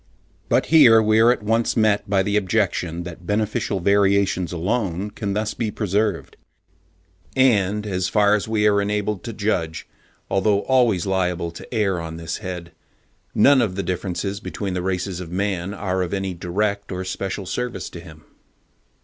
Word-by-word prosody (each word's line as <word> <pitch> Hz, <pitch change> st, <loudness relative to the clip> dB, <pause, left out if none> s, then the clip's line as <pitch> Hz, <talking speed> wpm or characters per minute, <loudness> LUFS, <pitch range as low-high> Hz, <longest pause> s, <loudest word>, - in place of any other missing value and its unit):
But -, -, +3 dB
here 115 Hz, -8 st, +8 dB
we 110 Hz, 0 st, +3 dB
are 115 Hz, +2 st, +6 dB
at 125 Hz, -, -2 dB
once 115 Hz, +3 st, +1 dB
met 105 Hz, -2 st, +2 dB
by 95 Hz, -1 st, +3 dB
the 100 Hz, +1 st, -1 dB
objection 95 Hz, -4 st, 0 dB
that 85 Hz, 0 st, -10 dB
beneficial 105 Hz, -1 st, -1 dB
variations 100 Hz, -1 st, +2 dB
alone 95 Hz, +2 st, -2 dB
can 105 Hz, -1 st, -4 dB
be -, -, 0 dB
thus 110 Hz, 0 st, -2 dB
preserved; 105 Hz, -3 st, -2 dB, 1.0 s
and 105 Hz, -6 st, +2 dB
as 90 Hz, -3 st, -1 dB
far 105 Hz, +1 st, +3 dB
as 105 Hz, 0 st, 0 dB
we 110 Hz, -1 st, +2 dB
are 100 Hz, -1 st, +3 dB
enabled 105 Hz, -1 st, -2 dB
to 115 Hz, -, -4 dB
judge, 100 Hz, -7 st, -2 dB, 0.4 s
although 100 Hz, +1 st, +2 dB
always 120 Hz, -9 st, +2 dB
liable 90 Hz, -3 st, -1 dB
to -, -, -12 dB
err 100 Hz, -7 st, 0 dB
on 80 Hz, 0 st, -6 dB
this 80 Hz, -1 st, -4 dB
head, 90 Hz, -4 st, -7 dB, 0.6 s
none 140 Hz, -2 st, +6 dB
of 100 Hz, -6 st, -1 dB
the 100 Hz, -, -2 dB
differences 95 Hz, +2 st, -3 dB
between 100 Hz, -3 st, -5 dB
the 90 Hz, -, -2 dB
races 90 Hz, 0 st, -2 dB
of 90 Hz, -2 st, -7 dB
man 95 Hz, 0 st, -2 dB
are 95 Hz, -2 st, -2 dB
of 90 Hz, +2 st, -2 dB
any 95 Hz, -1 st, -3 dB
direct 100 Hz, +4 st, -2 dB
or 95 Hz, 0 st, -4 dB
special 95 Hz, +1 st, -4 dB
service 125 Hz, +6 st, -4 dB
to 85 Hz, -, -8 dB
him. 80 Hz, -3 st, -14 dB
100 Hz, 165 wpm, -22 LUFS, 90-105 Hz, 1.0 s, here